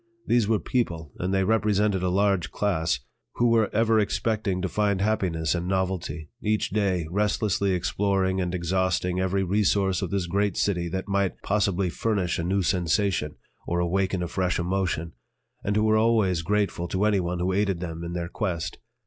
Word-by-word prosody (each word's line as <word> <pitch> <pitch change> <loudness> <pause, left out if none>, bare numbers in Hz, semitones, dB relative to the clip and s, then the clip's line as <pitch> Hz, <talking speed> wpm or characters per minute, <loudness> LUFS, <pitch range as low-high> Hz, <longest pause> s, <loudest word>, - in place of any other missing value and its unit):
These 120 -4 +2
were 110 0 +3
people 85 - -2
and 90 +1 -1
they 95 0 +2
represented 105 -2 +2
a 90 - +1
large 100 -1 +1
class 80 -9 0 0.3
who 120 0 +3
were 115 -2 +3
ever 110 0 +3
expecting 105 -2 0
to - - +1
find 100 0 0
happiness 95 -6 0
in 85 0 -2
novelty, 95 -4 -2
each 105 0 0
day 95 -5 +1
restlessly 100 -1 +1
exploring 95 +1 0
and 90 0 -2
exhausting 90 +1 0
every 95 +1 +1
resource 95 -1 +1
of - - -2
this 100 -3 -1
great 100 +2 0
city 90 -4 0
that 95 +3 -4
might 100 -1 -1
possibly 100 -3 +1
furnish 100 -5 -1
a - - -1
new 95 +3 +1
sensation 85 -2 0 0.3
or 85 - 0
awaken 95 +1 0
a - - -2
fresh 90 0 -1
emotion, 90 -2 -1 0.5
and 100 - 0
who 105 - +3
were 110 0 +4
always 110 -6 +2
grateful 100 -1 0
to 95 +4 0
anyone 90 -4 +1
who 90 +2 0
aided 100 -2 +1
them 85 -2 -5
in 85 0 -5
their 85 -1 -3
quest. 85 -3 -3
95 Hz, 175 wpm, -26 LUFS, 90-105 Hz, 0.5 s, were